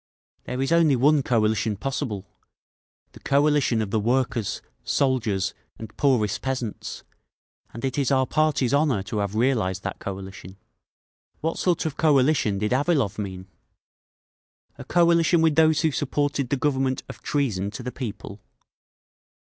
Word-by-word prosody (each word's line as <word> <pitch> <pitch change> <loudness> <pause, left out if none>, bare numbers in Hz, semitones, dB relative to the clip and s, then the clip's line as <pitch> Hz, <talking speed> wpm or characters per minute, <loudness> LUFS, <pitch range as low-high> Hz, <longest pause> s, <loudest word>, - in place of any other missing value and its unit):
There 125 +1 -4
is 135 - -2
only 165 -4 +4
one 145 +4 +4
coalition 110 -3 +1
possible—the 125 -4 -8
coalition 140 -5 +2
of 100 - -6
the 110 - +1
workers, 120 -1 0 0.2
soldiers 120 -8 0 0.2
and 110 -2 -10
poorest 105 -8 +1
peasants; 130 -5 -4 0.7
and 115 +3 -6
it 135 +2 -1
is 140 - +1
our 130 -1 +3
party's 150 -4 +1
honour 140 -9 +2
to 105 +2 -4
have 100 0 -2
realised 110 -6 0
that - - -5
coalition…. 95 -1 -8 0.8
What 165 +1 -2
sort 175 -3 +1
of 155 -2 -3
coalition 140 -8 +3
did 105 +2 -1
Avilov 140 - +1
mean? 95 -2 -5 1.3
A - - -6
coalition 170 0 +3
with 160 -1 +3
those 160 0 +4
who 160 - +2
supported 145 -1 -1
the 140 - 0
Government 130 -1 0
of - - -10
Treason 110 -10 -1
to 105 +4 -8
the 125 - -4
People? 110 -4 -7
130 Hz, 140 wpm, -24 LUFS, 105-145 Hz, 1.3 s, only